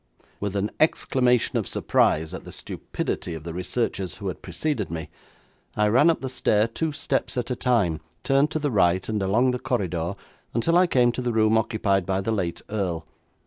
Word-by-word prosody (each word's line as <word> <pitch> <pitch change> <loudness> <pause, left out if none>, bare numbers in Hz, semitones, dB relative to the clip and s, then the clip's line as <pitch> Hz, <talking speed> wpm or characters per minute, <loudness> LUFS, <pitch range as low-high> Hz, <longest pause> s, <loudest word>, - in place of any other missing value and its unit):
With 100 -1 -3
an 100 +1 0
exclamation 125 -6 +2
of - - -3
surprise 80 +1 +1
at - - -6
the - - -10
stupidity 85 - -4
of 80 - -8
the 85 0 -6
researchers 90 -1 -2
who 100 - -4
had 90 - -7
preceded 105 - -2
me, 80 -2 -5 0.7
I 105 0 +3
ran 130 +9 +5
up 165 - +1
the 135 - -3
stair 110 -4 +2
two 155 +7 -2
steps 140 -3 -2
at 125 +1 -2
a - - 0
time, 115 -11 +1 0.2
turned 135 +2 +3
to 155 - -2
the 145 -2 -1
right, 95 -3 +2
and 110 -2 -1
along 115 +7 +3
the 125 - -2
corridor 95 - -1 0.4
until 165 +9 +2
I 180 +1 +5
came 125 -6 +4
to 125 - -4
the 125 -1 -1
room 110 0 +3
occupied 100 -4 +1
by 95 -1 +1
the 95 +4 -1
late 90 -6 -2
earl. 90 -6 -2
110 Hz, 195 wpm, -25 LUFS, 95-125 Hz, 0.7 s, ran